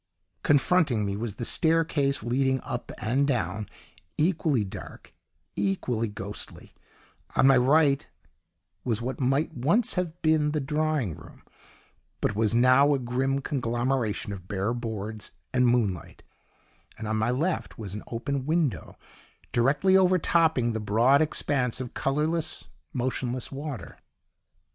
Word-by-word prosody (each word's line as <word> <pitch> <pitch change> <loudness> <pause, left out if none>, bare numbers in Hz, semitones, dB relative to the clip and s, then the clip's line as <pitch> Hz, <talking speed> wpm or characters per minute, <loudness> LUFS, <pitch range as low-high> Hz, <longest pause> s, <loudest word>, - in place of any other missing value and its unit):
Confronting 145 - +3
me 100 0 -2
was 105 -1 -4
the 120 - -4
staircase 160 -5 +2
leading 130 +3 +1
up - - -5
and 130 +7 +1
down, 105 -6 -1 0.5
equally 155 - +2
dark, 95 - -10 0.4
equally 105 +4 -1
ghostly; 105 0 -8 0.6
on - - +4
my 135 0 +7
right 140 +2 +3 0.7
was 115 -3 0
what 125 +2 -4
might 135 +4 +1
once 170 - +2
have 175 -2 -3
been 155 -2 +3
the 155 - +1
drawing 150 - 0
room, 80 -1 -14 0.8
but 105 - 0
was 110 +1 +1
now 130 +4 +5
a - - +1
grim 130 +2 -1
conglomeration 120 -5 -1
of 95 -2 -10
bare 100 +3 -1
boards 110 -3 -5 0.2
and 125 -1 +3
moonlight, 105 -9 -1 0.7
and 110 - -6
on 110 0 0
my 110 +2 +1
left 155 +8 -1
was 100 -4 -6
an 105 - -5
open 130 +3 -3
window 160 -5 -1 0.5
directly 140 +10 +3
overtopping 165 -9 +3
the 110 - -2
broad 115 +7 +3
expanse 140 -5 0
of 130 -2 -6
colourless, 155 +4 -1 0.3
motionless 125 0 -2
water. 140 -1 -7
130 Hz, 130 wpm, -27 LUFS, 110-150 Hz, 0.8 s, my